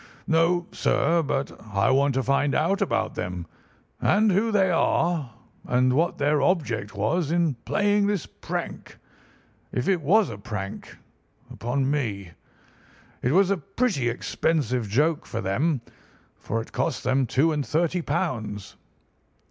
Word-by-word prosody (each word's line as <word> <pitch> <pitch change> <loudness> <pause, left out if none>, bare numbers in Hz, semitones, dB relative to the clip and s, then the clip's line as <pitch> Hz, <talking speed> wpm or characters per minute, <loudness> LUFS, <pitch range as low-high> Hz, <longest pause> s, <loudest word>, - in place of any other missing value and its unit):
"No, 170 +2 +2
sir. 165 +3 +2
But 140 -2 -2
I 100 +1 +1
want 135 0 +3
to 135 - +1
find 140 +1 +1
out 195 +6 +1
about 110 - 0
them, 90 -1 -4 0.6
and 210 +1 +3
who 210 +5 +2
they 190 -3 +3
are, 165 -3 +1 0.3
and 125 +1 +2
what 165 +6 +1
their 145 0 +2
object 120 - 0
was 145 - 0
in 170 -2 +2
playing 205 0 +2
this 200 -7 -1
prank—if 125 - -8
it 185 -4 +2
was 195 - +3
a 105 - -8
prank—upon 120 +5 -5
me. 100 - -2 0.9
It 125 - +1
was 190 +4 +4
a 200 - +2
pretty 195 - -1
expensive 125 -2 -1
joke 150 +8 +1
for - - -4
them, 130 - 0 0.5
for 115 - -3
it - - -17
cost 135 +2 -1
them 130 +1 +1
two 140 +8 +2
and 150 -2 -1
thirty 170 +4 0
pounds." 105 -9 -3
145 Hz, 135 wpm, -25 LUFS, 120-175 Hz, 0.9 s, was